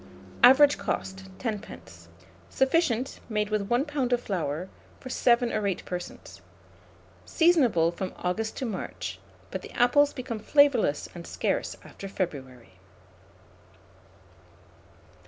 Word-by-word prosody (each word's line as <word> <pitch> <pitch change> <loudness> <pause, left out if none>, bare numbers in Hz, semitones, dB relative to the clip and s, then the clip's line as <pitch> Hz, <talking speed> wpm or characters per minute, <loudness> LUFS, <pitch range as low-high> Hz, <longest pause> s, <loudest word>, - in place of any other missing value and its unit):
Average 280 +4 +7
cost, 190 0 -4
10d. 215 -4 -7 0.4
Sufficient, 265 -3 +1
made 210 -1 -1
with 210 -1 -1
1 245 +4 +2
lb. 285 -5 -2
of 245 - +3
flour, 175 -4 -3 0.3
for 255 - -9
7 240 -1 +2
or 210 -1 0
8 190 - -3
persons. 180 -1 -7 0.8
Seasonable 265 - +3
from 185 +2 -5
August 220 +5 -2
to 265 - -3
March; 95 - -5 0.3
but 190 - -4
the - - -10
apples 285 +4 +4
become 240 -4 -5
flavourless 250 - +3
and 170 -1 -9
scarce - - -2
after 195 - -9
February. 130 - -6
215 Hz, 115 wpm, -27 LUFS, 180-255 Hz, 0.8 s, Average